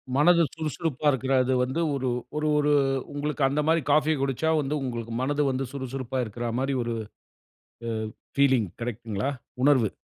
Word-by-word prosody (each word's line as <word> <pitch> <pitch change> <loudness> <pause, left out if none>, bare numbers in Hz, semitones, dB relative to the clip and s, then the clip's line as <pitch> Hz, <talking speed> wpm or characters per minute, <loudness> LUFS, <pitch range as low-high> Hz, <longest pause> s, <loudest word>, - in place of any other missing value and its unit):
மனது 170 +4 +5
சுறுசுறுப்பாருக்கிறது 135 -5 0
வந்து 130 +6 -1
ஒரு 130 -2 -1 0.3
ஒரு 155 - 0
ஒரு 150 0 +2 0.4
உங்களுக்கு 145 0 -2
அந்த 145 +2 +1
மாரி 165 +1 +3
காஃபி 155 +1 +4
குடிச்சா 135 +4 0
வந்து 145 +2 -2
உங்களுக்கு 115 -2 -4
மனது 145 +2 +1
வந்து 130 +1 -2
சுறுசுறுப்பாருக்கிற 125 -3 -3
மாரி 135 +1 0
ஒரு 115 0 -2 0.9
அ - - -1 0.5
பீலிங் 130 -6 +4
கரெக்ட்ங்களா? 115 +1 -3 0.3
உணர்வு. 130 -7 +4
135 Hz, 130 wpm, -26 LUFS, 125-150 Hz, 0.9 s, மனது